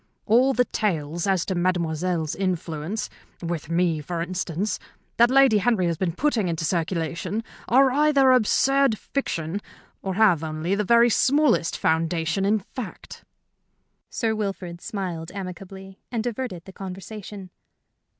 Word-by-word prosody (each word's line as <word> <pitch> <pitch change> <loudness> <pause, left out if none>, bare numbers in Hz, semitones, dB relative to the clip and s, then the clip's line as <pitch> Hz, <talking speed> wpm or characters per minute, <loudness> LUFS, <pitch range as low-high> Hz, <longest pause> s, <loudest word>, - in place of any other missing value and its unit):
All 250 +5 +4
the 250 0 +2
tales 170 -6 -2
as 190 -3 +1
to 190 - -2
Mademoiselle's 175 -2 0
influence 180 0 -2 0.3
with 170 -3 -4
me, 170 -2 +1
for 170 +3 -4
instance 185 +2 -2 0.4
that 235 +1 +6
Lady 265 -5 +5
Henry 210 -3 +2
has 170 -1 0
been 175 -2 -1
putting 235 - +1
into 165 -1 -2
circulation 170 +5 -2 0.2
are 265 +2 +5
either 280 -1 +4
absurd 260 +1 +3
fiction 195 - -3 0.4
or 190 -1 -3
have 190 -7 +4
only 160 +3 -2
the 205 +1 +1
very 235 +3 +5
smallest 270 - +3
foundation 165 +3 0
in 210 +2 +3
fact." 215 +1 -9 0.9
Sir 225 -3 -1
Wilfrid 195 -5 -4
smiled 175 -5 -5
amicably 190 0 -8
and 230 -3 -1
diverted 230 -7 -4
the 190 - -11
conversation. 195 0 -8
190 Hz, 130 wpm, -24 LUFS, 170-225 Hz, 0.9 s, that